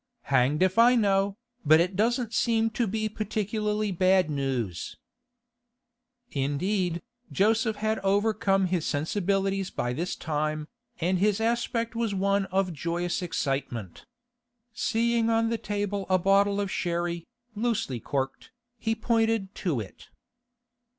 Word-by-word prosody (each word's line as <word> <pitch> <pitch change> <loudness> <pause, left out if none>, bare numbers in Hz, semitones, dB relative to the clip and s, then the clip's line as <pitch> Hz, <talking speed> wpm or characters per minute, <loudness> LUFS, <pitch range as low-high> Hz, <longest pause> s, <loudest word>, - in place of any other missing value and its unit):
'Hanged 140 +4 +2
if 185 +4 +2
I 240 +2 +7
know, 200 -2 +2 0.3
but 155 0 +6
it 180 +3 +1
doesn't 230 +2 +1
seem 225 -1 +2
to 225 +1 0
be 215 +2 -1
particularly 210 0 -2
bad 185 -2 +3
news.' 130 - -3 1.3
Indeed, 170 +6 -1 0.3
Joseph 220 +2 +2
had 215 +1 -1
overcome 195 -1 +2
his 180 -3 0
sensibilities 195 +5 0
by 120 0 -2
this 170 +7 -2
time, 155 -1 -2 0.3
and 180 +2 +1
his 205 +1 +2
aspect 230 0 0
was 230 -3 -1
one 200 +1 +1
of 190 -1 0
joyous 170 +4 -2
excitement. 135 - -3 0.7
Seeing 235 -1 +1
on 225 0 +2
the 230 - -1
table 205 -1 -2
a 185 - +4
bottle 200 +2 +3
of 200 -1 -2
sherry, 170 -1 -2 0.3
loosely 220 - -1
corked, 135 +3 -3 0.3
he 225 0 0
pointed 225 -3 +1
to 165 - -1
it. 100 -3 -9
195 Hz, 125 wpm, -27 LUFS, 170-220 Hz, 1.3 s, I